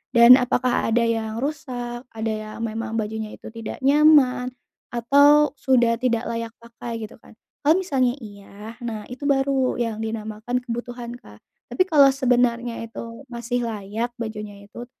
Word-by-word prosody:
Dan 235 +2 +9
apakah 250 0 +1
ada 235 0 +3
yang 225 -1 -1
rusak, 250 -5 -5
ada 220 0 -2
yang 215 0 -6
memang 225 0 -4
bajunya 220 0 -3
itu - - -11
tidak 225 +2 -7
nyaman 280 -3 +5 0.5
atau 285 +5 +5
sudah 240 -3 +3
tidak 240 -2 0
layak 230 -1 -4
pakai? 235 -1 -7
Gitu 215 - -10
kan. 220 - -18 0.3
Kalau 310 +3 +6
misalnya 265 -9 +1
iya, 205 +2 -11
nah 230 -4 -5
itu 255 +3 -7
baru 270 -2 +1
yang 230 -3 -2
dinamakan 220 +2 -3
kebutuhan, 240 0 -6
Kak. 105 - -17 0.3
Tapi 245 +10 +2
kalau 305 -7 +6
sebenarnya 245 -3 +1
itu 230 +3 -9
masih 240 0 -3
layak 220 +2 -4
bajunya 210 -2 -7
itu 240 +3 -9
235 Hz, 150 wpm, -23 LUFS, 220-255 Hz, 0.5 s, Dan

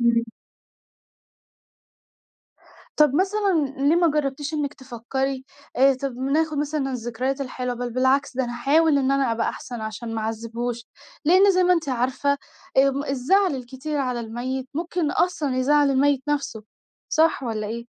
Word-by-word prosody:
إمم. 235 -1 +3 2.7
طب 300 -3 +4
مثلًا 380 -3 +2 0.2
ليه 330 - +4
ما 340 -2 +4
جربتيش 290 +1 -2
إنِك 295 -1 -2
تفكري 265 +1 -4 0.3
آآ، 270 +1 +5
طب 265 0 -4
ناخد 290 +4 0
مثلًا 295 -2 -1
الذكريات 250 +3 -3
الحلوة، 250 -2 -3
بل 245 0 -4
بالعكس، 260 +1 +1
ده 260 - +1
أنا 240 - -5
هاحاول 285 +5 +3
إن 270 0 +1
أنا 275 -4 +2
أبقى 230 - 0
أحسن 240 -2 -6
عشان 220 +1 -5
ما 220 - -2
اعذبهوش، 230 +2 -4 0.4
لأن 375 +5 +6
زي 370 0 +3
ما 360 - +5
أنتِ 330 -4 0
عارفة، 260 +3 0 0.4
أم 275 +1 +3
الزعل 295 +7 +2
الكتير 265 +4 -5
على 250 -3 -1
الميت 255 +3 -4
ممكن 335 -1 -1
أصلًا 295 -7 0
يزعّل 290 +2 +3
الميت 275 0 +2
نَفسه، 280 -7 -2 0.5
صح 320 -3 +2
والّا 220 -3 -3
إيه؟ 235 +2 -5
270 Hz, 145 wpm, -23 LUFS, 245-295 Hz, 2.7 s, لأن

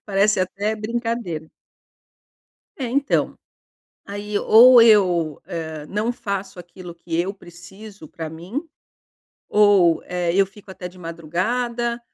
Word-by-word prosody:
parece 200 0 +2
até 200 +4 -2
brincadeira. 220 -7 -4 1.3
É 260 - -3
então, 280 +2 0 0.7
aí 205 +1 -5
ou 235 +3 +7
eu, 180 -9 +3
eh, 160 -3 -6
não 210 +4 -2
faço 195 -4 -5
aquilo 175 0 -10
que 170 0 -8
eu 190 +3 -2
preciso 190 0 -13
pra 160 -1 -7
mim, 175 - -6 0.9
ou, 200 -5 +4
eh, 180 -1 -2
eu 195 0 +4
fico 200 +1 -17
até 185 -1 -7
de 180 0 -16
madrugada 235 +9 -2
195 Hz, 120 wpm, -21 LUFS, 170-215 Hz, 1.3 s, ou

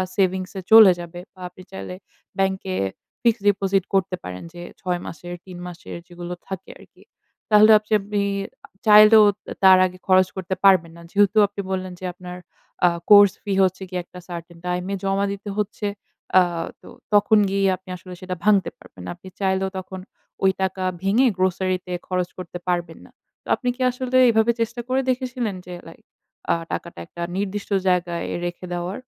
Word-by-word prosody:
সেভিংসয়ে 190 0 -1
চলে 220 -3 +10
যাবে 175 0 -8
বা, 185 - -22
আপনি 180 - -15
চাইলে 190 -1 -7 0.4
ব্যাংকে 190 -1 -1 0.5
ফিক্সড 230 -3 +2
ডিপোজিট 195 -1 +1
করতে 190 -1 +1
পারেন 90 0 -7
যে, 175 - -9 0.2
৬ 180 -1 -1
মাসের, 175 +2 -8
৩ 185 -2 -10
মাসের 175 -1 -9
যেগুলো 175 0 -7
থাকে 190 -2 -7
আরকি। - - -19 0.5
তাহলে 215 0 +7
আবযে 215 +1 -4
আপনি 205 +1 -2 0.6
চাইলেও 215 0 +8 0.2
তা - - -9
তার 190 -1 +8
আগে 185 0 -5
খরচ 185 -1 +5
করতে 190 0 -3
পারবেন 180 -4 +5
না। - - -13
যেহেতু 205 +1 +3
আপনি 200 0 -6
বললেন 185 -1 -3
যে, 185 - -7
আপনার 180 0 -9 0.5
আ - - +5 0.2
কোর্স 205 -2 +8
ফি 205 - -2
হচ্ছে 185 0 0
গিয়ে 180 -1 -3
একটা 180 - -12
certain 170 0 -8
time 180 0 -2
এ - - 0
জমা 195 +1 +1
দিতে 200 +1 -8
হচ্ছে। 210 0 -2 0.5
আ - - +6 0.4
তো - - -16 0.3
তখন 205 +1 +5
গিয়ে 195 0 +1
আপনি 185 0 -18
আসলে 180 +1 -11
সেটা 185 0 -4
ভাঙতে 200 -3 +3
পারবেন 90 - -15
না। - - -6
আপনি 180 +2 -15
চাইলেও 190 -1 0
তখন 190 0 -7 0.4
ওই 190 - +5
টাকা 190 0 -1 0.2
ভেঙে 215 +7 +3
গ্রোসারিতে 185 0 -1 0.2
খরচ 180 -1 -1
করতে 180 -1 -7
পারবেন 175 -2 -2
না। - - -18 0.3
তো - - -19
আপনি 250 - -3
কি 260 - -9
আসলে 255 +1 -1
এভাবে 220 0 +3
চেষ্টা 230 +1 -2
করে 260 +1 +1
দেখেছিলেন 250 -4 -2
যে, 180 - -8
লাইক 165 - -14 0.5
আ - - +5 0.2
টাকাটা 170 - -5
একটা 170 - -10 0.2
নির্দিষ্ট 200 +1 -3 0.2
জায়গায় 175 -2 0 0.2
রেখে 175 +1 -5
দেওয়ার? 175 +3 -4
190 Hz, 175 wpm, -22 LUFS, 180-205 Hz, 0.6 s, চলে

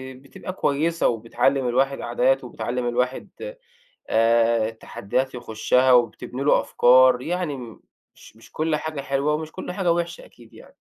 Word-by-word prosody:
بتبقى 140 +7 -9
كويسة 165 0 0
وبتعلّم 125 +3 0
الواحد 135 +3 0
عادات 130 +3 +1
وبتعلّم 125 0 -4
الواحد 125 +2 -2 0.8
آآ 115 0 +3
التحديات 115 +3 -4
يخشها 125 +2 +1
وبتبني 125 +2 +1
له 145 - +4
أفكار 125 0 +4
يعني 170 -1 -3
م 120 -3 -11 0.3
مش - - -17
مش 115 - -18
كل 155 0 -1
حاجة 155 -1 -4
حلوة 140 +2 -1
ومش 155 +1 -4
كل 185 - -7
حاجة 180 -2 +1
وحشة 170 0 -4
أكيد 115 -2 -19
يعني. - - -16
130 Hz, 145 wpm, -23 LUFS, 120-150 Hz, 0.8 s, له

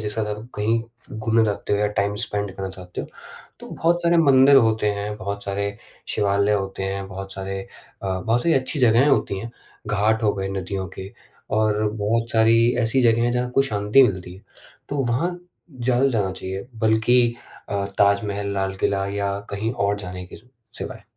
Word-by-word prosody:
जिसके 105 +1 -3
साथ - - -2
आप 110 +3 -11
कहीं 110 +2 +1 0.4
घूमने 115 0 +2
जाते 105 -1 -2
हो 100 - +2
या 105 - +2
टाइम 100 +1 +1
स्पीड 100 -2 -3
करना 95 -1 -4
चाहते 90 -1 -8
हो, - - -6 0.5
तो - - -10
बहुत 175 +1 0
सारे 170 0 +3
मंदिर 140 -2 +6
होते 110 -3 +3
हैं, 105 +1 -4
बहुत 100 0 -5
सारे 100 +1 -2 0.3
शिवालय 100 0 +1
होते 95 -1 -2
हैं, 95 0 -3
बहुत 95 0 -7
सारे 95 0 -4 0.4
अ, 95 -1 -2
बहुत 115 +5 +1
सारी 165 - +3
अच्छी 135 +3 0
जगहें 125 +3 +5
होती 120 -8 +1
हैं। 115 +4 -6 0.4
घाट 110 +2 +1
हो 105 -2 +3
गए 95 -1 -3
नदियों 95 0 -3
के 95 +1 -7 0.4
और 110 0 +2
बहुत 115 +2 -1
सारी 115 0 +5 0.2
ऐसी 125 +3 +2
जगहें 115 0 +4
हैं 120 - +1
जहाँ 125 0 0
आपको 125 +2 +2
शांति 105 +1 +3
मिलती 90 -5 -1
है। 95 - -15 0.5
तो 145 - -3
वहाँ 170 +10 -1 0.4
ज़्यादा 125 +2 +2
जाना 105 -7 0
चाहिए, 95 +2 -6
बल्कि 115 +2 +3 0.3
अ, 100 -1 -1
ताजमहल, 100 0 +2
लाल 95 0 -1
किला 100 0 0
या 100 0 -2
कहीं 105 +3 -2
और 100 -2 0
जाने 90 -2 -7
के 85 - -11
स 115 - -19 0.3
सिवाय। - - -7
105 Hz, 185 wpm, -23 LUFS, 100-115 Hz, 0.5 s, मंदिर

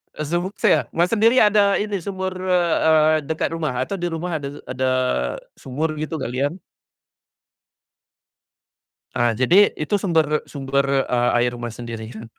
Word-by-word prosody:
Eee, 155 - -4
sumuk 180 +3 -2
saya. - - +2
Mas, 175 +2 +2
sendiri 230 +2 +4
ada 205 -1 +4
ini 205 -2 -2
sumur, 190 +1 -4
eee 180 -3 +1
eee, 155 0 +4
dekat 160 0 -2
rumah 150 -6 -2
atau 195 - -4
di 175 - -1
rumah 165 -1 -3
ada 140 - -5 0.2
ada 130 0 -1 0.7
sumur 150 +4 -3
gitu, 155 +1 -4
galian? 140 +3 -2 2.6
Ah, 120 -2 +2
jadi 175 - +5
itu 155 +6 -1
sumber 160 -5 +1
sumber 140 -1 0
a 120 0 +2
air 120 0 +1
Mas, 120 -2 -6
sendiri 115 -2 -7
kan? 110 +1 -8
155 Hz, 145 wpm, -21 LUFS, 130-180 Hz, 2.6 s, jadi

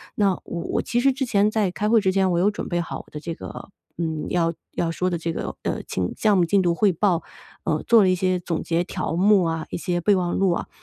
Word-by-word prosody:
那 200 -2 +3
我 170 - -5
我 - - -1
其 240 - 0
实 270 +2 +4
之 265 +1 -2
前 210 -3 +2
在 215 -4 0
开 210 +3 -1
会 225 -2 +5
之 190 - +2
前 190 0 +2
我 170 - +1
有 205 +3 +3
准 - - -5
备 175 -1 0
好 - - -5
我 - - -12
的 150 - -6
这 165 +2 -5
个， 165 - -9 0.3
嗯， 160 -2 -2
要 165 -1 +1 0.2
要 165 - -1
说 180 +2 -1
的 175 - -1
这 165 0 -3
个， - - -4
呃， - - -2
清 90 -1 -3
项 210 -3 +3
目 175 - +4
进 200 +3 +3
度 175 -2 +1
汇 205 +2 +3
报， 175 -1 +1 0.4
呃， - - 0
做 230 -3 +6
了 185 - +4
一 - - +4
些 185 0 0
总 170 -2 -3
结 170 +1 0
条 180 -3 -3
目 195 +1 +4
啊， 165 -1 -2
一 - - -2
些 175 0 -1
备 200 +3 +4
忘 175 -1 -1
录 195 -2 +3
啊， 170 - -2
185 Hz, 290 characters per minute, -23 LUFS, 170-205 Hz, 0.4 s, 做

